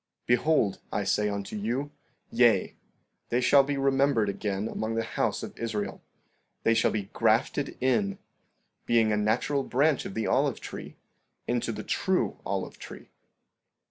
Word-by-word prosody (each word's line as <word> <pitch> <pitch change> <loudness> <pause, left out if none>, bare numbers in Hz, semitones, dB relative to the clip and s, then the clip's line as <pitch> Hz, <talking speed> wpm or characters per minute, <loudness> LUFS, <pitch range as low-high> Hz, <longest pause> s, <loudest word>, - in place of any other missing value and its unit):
15:16 - - -51
Behold, 120 -4 +2
I 105 - -1
say 105 +2 +1
unto 100 0 -4
you, 120 +8 -2 0.4
Yea; 115 -5 +3 0.5
they 120 - +2
shall 140 +2 +6
be 140 +1 -2
remembered 135 -5 +2
again 100 +1 -2
among 115 0 -3
the 115 - 0
house - - -1
of - - -7
Israel; 110 -3 -3 0.6
they 115 - +4
shall 115 - +3
be 100 -2 -4
grafted 115 +5 +1
in, 195 +10 +1 0.7
being 115 -2 +3
a - - +2
natural 110 +7 +1
branch 140 +3 +1
of 95 - -6
the 110 - -1
olive - - +1
tree, - - -8 0.5
into 120 -1 -1
the 110 -1 -6
true 190 -1 0
olive - - -3
tree. - - -11
115 Hz, 150 wpm, -28 LUFS, 105-135 Hz, 0.7 s, shall